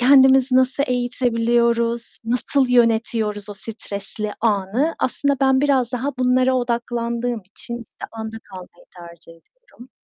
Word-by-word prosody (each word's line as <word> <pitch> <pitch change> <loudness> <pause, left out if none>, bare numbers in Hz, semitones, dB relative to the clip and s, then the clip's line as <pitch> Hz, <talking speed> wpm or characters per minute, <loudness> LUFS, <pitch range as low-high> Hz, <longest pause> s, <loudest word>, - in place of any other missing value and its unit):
kendimizi 265 0 +5
nasıl 260 +2 +2
eğitebiliyoruz, 235 -1 0
nasıl 250 +3 0
yönetiyoruz 225 -3 +1
o - - -7
stresli 210 0 -6
anı? 220 +8 0
Aslında 280 +2 0
ben 265 -1 +3
biraz 265 -4 +1
daha 250 +3 -2
bunlara 255 +1 +3
odaklandığım 235 -1 -2
için, 235 +5 -7
işte, 230 - -10
anda 220 0 -6
kalmayı 180 -2 -12
tercih 170 -1 -12
ediyorum. 255 - -19
235 Hz, 120 wpm, -21 LUFS, 220-255 Hz, -, kendimizi